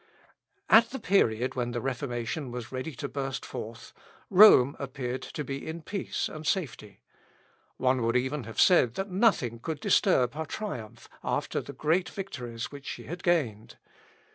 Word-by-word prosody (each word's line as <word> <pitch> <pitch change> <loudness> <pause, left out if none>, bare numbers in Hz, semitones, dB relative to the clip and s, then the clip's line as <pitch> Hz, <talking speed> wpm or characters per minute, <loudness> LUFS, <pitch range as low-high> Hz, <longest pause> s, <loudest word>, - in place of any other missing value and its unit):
At 230 +1 +7
the 265 - -5
period 130 - +2
when 120 -1 -2
the 120 - -1
Reformation 125 +2 -3
was 120 -1 -7
ready 130 +3 -5
to 140 +2 -4
burst 135 -1 -4
forth, 115 -2 -8 0.4
Rome 180 -9 +8
appeared 130 -2 -4
to 150 - -5
be 135 0 -6
in 160 +1 -6
peace 195 +4 -3
and 155 - -8
safety. 125 - -3 0.8
One 130 0 +2
would 115 +1 +2
even 130 +1 -2
have 115 -1 -7
said 130 -11 +5
that 195 0 -4
nothing 180 - +2
could 155 +4 -4
disturb 125 -3 +3
her 160 +1 -4
triumph 125 - -6 0.2
after - - -1
the - - -9
great 170 +4 +1
victories 125 - -6
which 140 -1 -10
she - - -6
had 175 +3 -7
gained. 125 - 0
135 Hz, 160 wpm, -28 LUFS, 120-165 Hz, 0.8 s, Rome